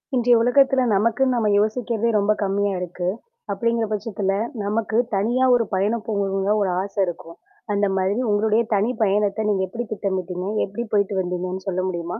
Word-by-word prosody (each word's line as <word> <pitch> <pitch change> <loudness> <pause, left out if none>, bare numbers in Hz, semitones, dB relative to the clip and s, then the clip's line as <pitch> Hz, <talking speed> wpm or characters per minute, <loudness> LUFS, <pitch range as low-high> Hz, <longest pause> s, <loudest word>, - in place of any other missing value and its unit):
இன்றைய 245 0 +4
உலகத்தில 265 +3 +4
நமக்குன்னு 230 +5 +2
நம்ம 225 -3 +1
யோசிக்கிறதே 225 +1 0
ரொம்ப 205 +1 +2
கம்மியா 200 0 0
இருக்கு. 180 0 -4 0.4
அப்படிங்கிற 230 +3 0
பட்சத்தில 200 -2 -2 0.3
நமக்கு 215 +2 -1 0.2
தனியா 240 +6 +1
ஒரு 235 -2 +1
பயணம் 210 +4 0
போகணுங்குற் 200 0 0
ஒரு 190 -2 +1
ஆச 200 - -8
இருக்கும். 170 -1 -7 0.4
அந்த 200 0 +1
மாதிரி, 190 +4 0
உங்களுடைய 215 +2 +2
தனி 205 +5 +1
பயணத்தை 205 +1 +1
நீங்க 190 -2 0
எப்படி 240 +5 -4
திட்டமிட்டீங்க, 185 -3 -3 0.2
எப்படி 235 +5 -5
போய்ட்டு 200 -1 +1
வந்தீங்கன்னு 185 +1 -4
சொல்ல 185 -1 -1
முடியுமா? 175 +2 -4
205 Hz, 155 wpm, -22 LUFS, 190-230 Hz, 0.4 s, இன்றைய